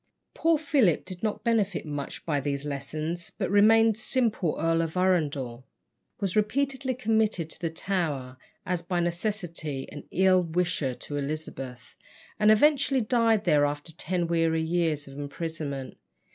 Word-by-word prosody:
Poor 330 -1 +3
Philip 280 - +2
did 185 -2 -8
not 215 -1 -2
benefit 215 -7 +1
much 145 -2 -5
by 150 -3 +1
these 140 0 -3
lessons, 155 +4 -4
but - - -2
remained 220 +1 +5
simple 220 - +1
Earl 165 0 +2
of 165 +1 -3
Arundel, 145 -9 0 0.6
was 195 -3 -1
repeatedly 260 +4 0
committed 220 -8 +1
to - - -4
the 165 - -1
Tower, 160 -7 -2 0.3
as 180 -2 -1
by 175 +1 -2
necessity 170 -5 -2
an 145 - -9
ill 185 0 +4
wisher 165 -6 -1
to 145 - -6
Elizabeth, 140 -4 -6 0.4
and 210 0 +5
eventually 275 +3 +4
died 225 -1 +2
there 145 -1 +4
after 145 +2 -2
ten 175 +2 -2
weary 165 -1 +1
years 160 -3 0
of 135 +1 -9
imprisonment. 145 -2 -5
170 Hz, 145 wpm, -27 LUFS, 150-215 Hz, 0.6 s, remained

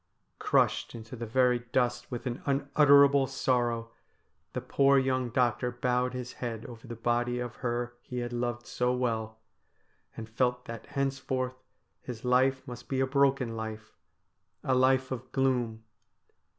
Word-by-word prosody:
Crushed - - +1
into 115 +1 -8
the 115 -1 -5
very 125 +1 +3
dust 120 0 -1
with 120 +1 -5
an 125 -1 -3
unutterable 140 0 +5
sorrow, 120 -3 0 0.6
the - - -1
poor 140 0 +3
young 130 -2 +1
doctor 125 0 +1
bowed 125 0 0
his 125 0 -5
head 115 -3 -4
over 120 +1 -10
the 120 - -6
body 120 +1 0
of 120 -1 -5
her 120 -1 -2
he 125 - -7
had 120 0 -3
loved 120 0 -2
so 125 0 0
well, 110 -3 -2 0.8
and 110 - -6
felt 125 +2 0
that 115 -1 -8
henceforth 130 -2 -2 0.4
his 120 -2 -8
life 130 +2 +2
must 120 -1 -9
be 135 - 0
a 135 - +3
broken 135 -3 +2
life, 110 -1 -6 0.7
a 130 - +1
life 130 0 +3
of 130 0 -5
gloom. 125 -4 0
125 Hz, 150 wpm, -29 LUFS, 120-130 Hz, 0.8 s, unutterable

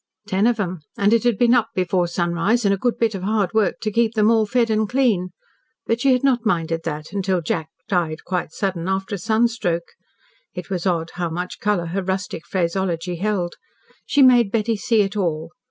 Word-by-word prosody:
Ten 200 +2 +2
of 240 -2 +1
'em, 185 -3 -2 0.2
and 205 +2 +3
it 230 - +3
had 240 -4 +2
been 240 +1 +4
"up 230 -3 +3
before 180 -1 +1
sunrise, 175 +7 0
and 200 - +4
a - - 0
good 240 +4 0
bit 230 -2 +1
of 195 - -5
hard 200 -2 0
work 215 -4 +1
to 215 - -1
keep 230 +1 +1
them 215 +1 +4
all 220 -2 +3
fed 235 0 +1
and 215 -1 +1
clean." 230 -9 +1 0.6
But 230 +1 0
she 275 - +4
had 250 0 +2
not 255 -4 +2
minded 165 -6 0
that 150 0 -5
until 190 -2 0
Jack 160 -1 -3 0.2
died 170 -4 -1
quite 180 -4 -2
sudden 185 -2 -3
after 190 +1 -2
a 200 - -2
sunstroke. 220 -5 0 0.6
It 180 0 -7
was 185 0 -1
odd 165 -2 -1
how 175 - 0
much 180 +2 -5
colour 205 -4 0
her 180 +4 -2
rustic 185 -3 -4
phraseology 180 -1 -1
held. 185 -2 -2 0.5
She 285 - +4
made 240 -5 +5
Betty 225 0 +1
see 215 0 +2
it 195 +1 -4
all. 165 -4 -2
195 Hz, 205 wpm, -21 LUFS, 175-225 Hz, 0.6 s, made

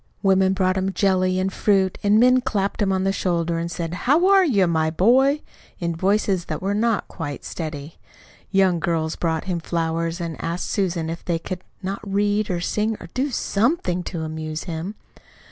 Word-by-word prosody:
Women 190 -1 +4
brought 185 -1 +1
him 190 +1 -1
jelly 185 -2 +2
and 190 +1 -1
fruit, 195 -3 +1
and 205 +1 +4
men 255 +1 +5
clapped 210 -6 -1
him 195 -1 +2
on 190 0 +1
the 195 - +2
shoulder 170 -3 0
and 170 0 -3
said, 170 -1 -4
"How 290 - +2
are 390 -1 +6
you, 215 - +3
my 160 -2 +1
boy?" 260 - +3 0.4
in 170 -1 -2
voices 190 0 +1
that - - -4
were 195 +2 -1
not 225 +1 +1
quite 145 -5 -6
steady. 155 -2 -6 0.5
Young 190 -3 +3
girls 165 -3 -1
brought 160 -2 -1
him 180 -3 -2
flowers, 165 0 -2
and 165 -2 -5
asked 170 +2 -3
Susan 175 -5 0
if 165 +1 -5
they 170 -2 0
could 180 +2 -6 0.2
not 195 +1 -3
read 205 +1 0
or 175 -2 -1
sing 215 +4 -1
or - - -10
do 265 +3 0
SOMETHING 210 - 0
to 165 -4 -4
amuse 155 0 -4
him. 175 +4 -5
185 Hz, 185 wpm, -23 LUFS, 170-205 Hz, 0.5 s, are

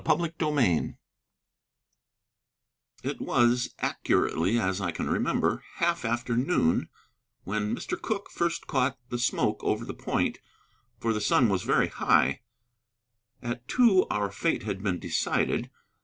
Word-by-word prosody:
CHAPTER 170 +1 +1
XVIII 140 - +1 2.1
It - - -4
was, 120 +1 +2
accurately 95 +8 +1
as 95 -3 0
I 95 - -1
can 85 - -3
remember, - - 0
half 170 -2 0
after 120 +1 -1
noon 125 - +2 0.5
when 105 +3 -1
Mr. - - -5
Cooke 205 -3 -3
first 170 0 -1
caught 130 -1 0
the 120 - -3
smoke 120 - 0
over - - 0
the - - -5
point, - - -1 0.6
for 115 -1 0
the 105 - -2
sun 115 +3 +4
was 95 -2 +1
very - - +2
high: 65 +2 +2 1.0
at 120 +1 -4
two 225 -7 +4
our 100 -1 -1
fate 165 +11 -1
had 100 -3 -3
been 95 -3 0
decided. - - 0
120 Hz, 130 wpm, -28 LUFS, 100-150 Hz, 2.1 s, sun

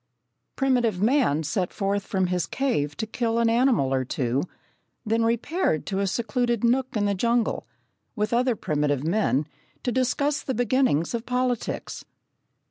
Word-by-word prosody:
Primitive 245 -7 +1
man 220 - +2
set 175 +4 -1
forth 200 0 -2
from 190 -2 +1
his 180 -2 -1
cave 150 - -1
to - - -2
kill 230 +1 -1
an 230 -1 +3
animal 230 - +3
or 130 -1 +1
two, 130 +1 -1 0.6
then 225 +1 +1
repaired 235 - 0
to 195 -1 -2
a 200 - +1
secluded 235 +3 -1
nook 250 0 +1
in 205 - +1
the 200 - +1
jungle, 235 +3 0 0.5
with 215 0 -1
other 245 0 +2
primitive 145 -6 -1
men, 160 -5 +1 0.4
to 250 - 0
discuss 275 +4 0
the 265 - -3
beginnings 245 - +1
of 235 0 -3
politics. 250 -1 -2
225 Hz, 150 wpm, -25 LUFS, 180-250 Hz, 0.6 s, an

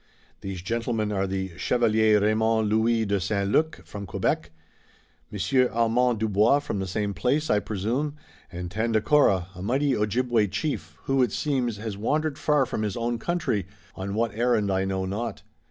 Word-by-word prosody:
"These 95 -3 -6
gentlemen 115 0 -1
are 95 -1 0
the 95 -1 -3
Chevalier 110 -3 +3
Raymond 110 +1 +2
Louis 110 +1 +2
de 100 -1 0
St. 100 +1 -1
Luc, 155 - +1
from 100 +4 -7
Quebec, 85 -3 -1 0.8
Monsieur 125 +6 +1
Armand 115 +1 +2
Dubois, 110 +4 +3
from 145 -8 -3
the 95 - -3
same 100 +2 -2
place, 140 +8 0
I 105 - +4
presume, 115 +10 -2 0.4
and 90 0 -6
Tandakora, 110 -2 +2
a 90 - -9
mighty 135 +6 +1
Ojibway 115 +1 +1
chief, 105 +10 -4
who, 135 0 +1
it 125 -5 +2
seems, 130 -7 -1
has 105 -1 -5
wandered 150 +7 -1
far 150 -3 +3
from 110 - -3
his 105 0 -2
own 120 0 -1
country, 135 - -1 0.3
on 100 +1 -5
what 115 +1 0
errand 110 -3 +1
I 95 0 +1
know 95 -1 -1
not. 105 +3 -4
110 Hz, 165 wpm, -26 LUFS, 100-125 Hz, 0.8 s, I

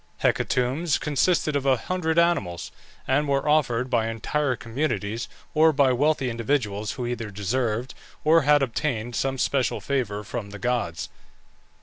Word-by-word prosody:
Hecatombs 140 +6 +1
consisted 155 +1 +1
of 140 - 0
a 135 -2 +3
hundred 165 +4 -2
animals, 170 - +1 0.4
and 145 +3 +2
were 140 +1 0
offered 130 -5 +2
by 115 -3 +1
entire 125 +5 -1
communities, 115 -3 -2 0.3
or 160 +1 +5
by 140 -3 +3
wealthy 145 +1 +1
individuals 115 -3 -1
who 125 - -4
either 120 -2 -3
desired, 110 +4 -2 0.3
or 160 +2 +5
had 145 0 +4
obtained 120 -2 -2
some 135 0 -1
special 130 -1 0
favour 115 -7 -2
from 105 0 -5
the 105 - -8
gods. 120 -6 -2
130 Hz, 140 wpm, -25 LUFS, 115-150 Hz, 0.4 s, or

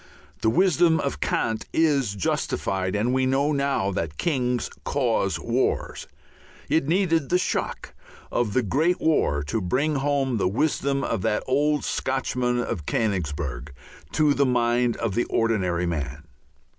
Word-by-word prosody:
The 110 - +3
wisdom 170 +2 +3
of 140 - -2
Kant 110 -1 -1
is 140 -10 +2
justified, 95 0 -1
and 115 +5 +1
we 130 0 +2
know 140 +3 +2
now 140 -8 0
that 80 -4 -3
kings 125 -6 0 0.2
cause 115 -8 0
wars. 120 +3 -1 0.6
It 160 -3 +2
needed 165 -4 +1
the 180 - +4
shock 180 - -3 0.4
of 115 -4 0
the 130 - +2
great 155 - +1
war 75 - +1
to 80 +10 -2
bring 140 - 0
home 135 -3 0
the 100 - +1
wisdom 140 +5 0
of 115 - -1
that 105 - 0
old 145 +2 +1
Scotchman 125 -2 -1
of 80 -10 -3
Königsberg 75 - -2 0.4
to 150 -2 +3
the 140 -1 +2
mind 120 -1 +1
of 115 -4 -2
the 120 - +1
ordinary 95 -6 0
man. 75 -3 -3
125 Hz, 145 wpm, -25 LUFS, 100-140 Hz, 0.6 s, the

